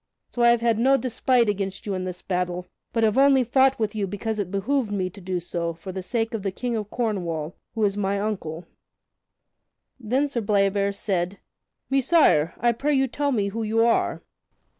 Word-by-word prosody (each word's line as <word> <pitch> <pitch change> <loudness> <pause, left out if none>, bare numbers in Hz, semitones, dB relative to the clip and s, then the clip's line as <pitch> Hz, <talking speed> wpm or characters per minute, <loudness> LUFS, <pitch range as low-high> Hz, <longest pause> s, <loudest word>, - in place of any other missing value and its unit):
So 240 - -4
I 235 - +6
have 235 -1 +3
had 230 -2 +2
no 270 +3 +4
despite 250 -1 +1
against 195 -1 -2
you 205 - -2
in 185 -1 -3
this 180 -1 -6
battle, 180 -1 -2 0.3
but 230 -1 0
have 220 +3 +3
only 275 -1 +5
fought 265 +2 +3
with 215 -2 -1
you 205 -2 -2
because 215 +3 -3
it 195 -3 -2
behooved 210 +4 -1
me 185 -3 -1
to 200 - -13
do 180 0 -2
so 170 -1 -3
for 170 +3 -8
the 190 +1 -5
sake 225 +4 -2
of 225 - -2
the 195 - -1
King 240 +5 -3
of 210 -2 -3
Cornwall, 175 -10 -2 0.2
who 220 - 0
is 200 -1 0
my 200 -1 0
uncle." 180 -6 -4 1.3
Then 260 +5 0
Sir 255 -4 -2
Bleoberis 200 -1 +1
said, 190 -2 -1 0.5
"Messire, 270 - +3
I 240 +1 +3
pray 285 +5 0
you 270 0 +2
tell 285 +3 -1
me 205 -6 0
who 225 +3 -4
you 225 +1 +2
are?" 235 - +1
210 Hz, 200 wpm, -24 LUFS, 190-240 Hz, 1.3 s, I